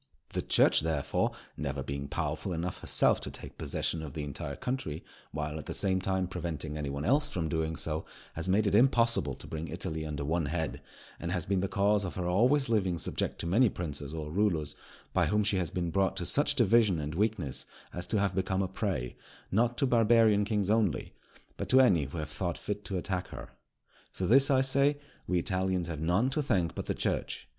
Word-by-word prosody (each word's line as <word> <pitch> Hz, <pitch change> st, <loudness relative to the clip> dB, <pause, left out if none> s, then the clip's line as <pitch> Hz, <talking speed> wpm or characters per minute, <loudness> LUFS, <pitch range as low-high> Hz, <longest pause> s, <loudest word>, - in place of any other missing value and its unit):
The -, -, 0 dB
Church, -, -, +4 dB
therefore, 75 Hz, -3 st, 0 dB, 0.3 s
never 70 Hz, -2 st, -3 dB
being 70 Hz, +1 st, -4 dB
powerful 80 Hz, +5 st, -2 dB
enough 85 Hz, +2 st, -3 dB
herself -, -, +2 dB
to -, -, -4 dB
take -, -, -10 dB
possession 80 Hz, -, -2 dB
of 75 Hz, -4 st, -8 dB
the 75 Hz, -, -3 dB
entire 70 Hz, 0 st, -5 dB
country, 125 Hz, -, -3 dB, 0.3 s
while, 75 Hz, +1 st, -3 dB
at -, -, -9 dB
the -, -, -3 dB
same 95 Hz, -2 st, +1 dB
time, 95 Hz, 0 st, 0 dB
preventing 80 Hz, -4 st, -4 dB
any 75 Hz, -2 st, -3 dB
one 70 Hz, +1 st, -3 dB
else 145 Hz, +3 st, +3 dB
from 90 Hz, -, -2 dB
doing 80 Hz, 0 st, -1 dB
so, 80 Hz, 0 st, -2 dB, 0.3 s
has 85 Hz, +3 st, -3 dB
made 105 Hz, +3 st, +3 dB
it 100 Hz, -, +1 dB
impossible 115 Hz, -, +3 dB
to -, -, -11 dB
bring 80 Hz, +1 st, -5 dB
Italy 80 Hz, -2 st, -4 dB
under 75 Hz, -2 st, -4 dB
one 80 Hz, 0 st, 0 dB
head; 75 Hz, -4 st, -2 dB, 0.4 s
and 85 Hz, -, -3 dB
has 90 Hz, -3 st, -1 dB
been 95 Hz, 0 st, +1 dB
the 100 Hz, -, 0 dB
cause 100 Hz, +1 st, +2 dB
of 90 Hz, -, -5 dB
her 90 Hz, -, -2 dB
always 125 Hz, +10 st, +3 dB
living 95 Hz, -6 st, +1 dB
subject -, -, -2 dB
to -, -, -5 dB
many 110 Hz, +8 st, +4 dB
princes 75 Hz, -6 st, -4 dB
or 75 Hz, -2 st, -5 dB
rulers, 80 Hz, -6 st, 0 dB, 0.4 s
by -, -, +3 dB
whom 105 Hz, 0 st, +2 dB
she 100 Hz, -1 st, +2 dB
has 90 Hz, -3 st, -1 dB
been 85 Hz, -2 st, -2 dB
brought 95 Hz, +1 st, +1 dB
to 85 Hz, -, -2 dB
such 145 Hz, +6 st, +3 dB
division 115 Hz, -6 st, +4 dB
and 75 Hz, 0 st, -4 dB
weakness 100 Hz, -, -1 dB, 0.3 s
as 90 Hz, +1 st, -5 dB
to 110 Hz, -, +1 dB
have 100 Hz, -1 st, +1 dB
become 95 Hz, +1 st, 0 dB
a -, -, -1 dB
prey, 90 Hz, -, -3 dB, 0.4 s
not 120 Hz, +4 st, +2 dB
to -, -, +2 dB
Barbarian 115 Hz, -4 st, +4 dB
kings 105 Hz, -2 st, 0 dB
only, 110 Hz, -8 st, +1 dB, 0.4 s
but -, -, -4 dB
to 130 Hz, -, +6 dB
any 95 Hz, -, +5 dB
who 70 Hz, +5 st, -7 dB
have 75 Hz, -1 st, -4 dB
thought 90 Hz, -3 st, -2 dB
fit 105 Hz, 0 st, -4 dB
to 95 Hz, -, -2 dB
attack 90 Hz, 0 st, -2 dB
her. -, -, -9 dB, 0.6 s
For 95 Hz, -, -3 dB
this, 135 Hz, +8 st, +5 dB
I 130 Hz, -2 st, +4 dB
say, 140 Hz, +2 st, +3 dB, 0.3 s
we 90 Hz, -, +1 dB
Italians 95 Hz, 0 st, 0 dB
have 80 Hz, -3 st, -5 dB
none 95 Hz, +11 st, +2 dB
to 150 Hz, -, +1 dB
thank 90 Hz, -, +1 dB
but -, -, -5 dB
the -, -, -1 dB
Church. -, -, -2 dB
90 Hz, 210 wpm, -30 LUFS, 80-105 Hz, 0.6 s, to